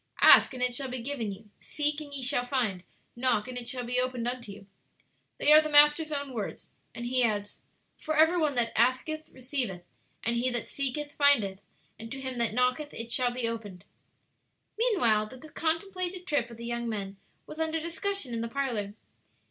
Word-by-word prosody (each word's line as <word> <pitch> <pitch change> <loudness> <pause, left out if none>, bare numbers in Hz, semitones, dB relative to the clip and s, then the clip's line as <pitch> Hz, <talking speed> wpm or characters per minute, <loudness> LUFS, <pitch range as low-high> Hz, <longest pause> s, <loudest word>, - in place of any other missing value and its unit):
"'Ask, - - +9
and 250 - -2
it 250 -1 +1
shall 270 +2 -2
be 250 -2 -5
given 240 -6 -3
you; 210 +2 -12
seek, 295 0 -2
and 290 -1 -9
ye 275 -2 -4
shall 245 0 +1
find; 235 -9 -1 0.3
knock, 240 -3 +1
and 255 - -7
it 240 -1 -4
shall 250 -1 -2
be 245 +1 0
opened 250 -2 -1
unto 245 -4 -4
you.' 200 0 -12 0.7
"They 295 - +3
are 310 - +9
the 310 - -4
Master's 295 +1 +5
own 280 -2 -2
words; 220 -4 -6 0.3
and 235 - -5
He 250 +1 +2
adds: 205 -3 -1 0.4
'For 310 0 -2
every 320 +3 +5
one 300 -4 +1
that 235 -2 +1
asketh 260 +7 +1
receiveth; 250 -8 -4 0.4
and 235 +1 0
he 250 +2 +1
that 240 -2 -3
seeketh 285 +2 -3
findeth; 225 -10 +4 0.4
and 225 0 -9
to 275 - -6
him 260 -2 -4
that 230 -2 0
knocketh 250 +4 0
it 230 +1 -6
shall 250 0 +3
be 245 -1 -2
opened.'" 205 -5 -6 0.9
Meanwhile 325 - +2
the 260 +6 -12
contemplated 360 +2 -2
trip 285 -8 0
of 235 - -11
the 235 - -8
young 235 0 -3
men 200 -3 -4 0.3
was 310 - -10
under 320 0 0
discussion 335 -3 -2
in 230 - -2
the 230 - -2
parlor. 230 -6 -3
250 Hz, 195 wpm, -29 LUFS, 230-295 Hz, 0.9 s, Ask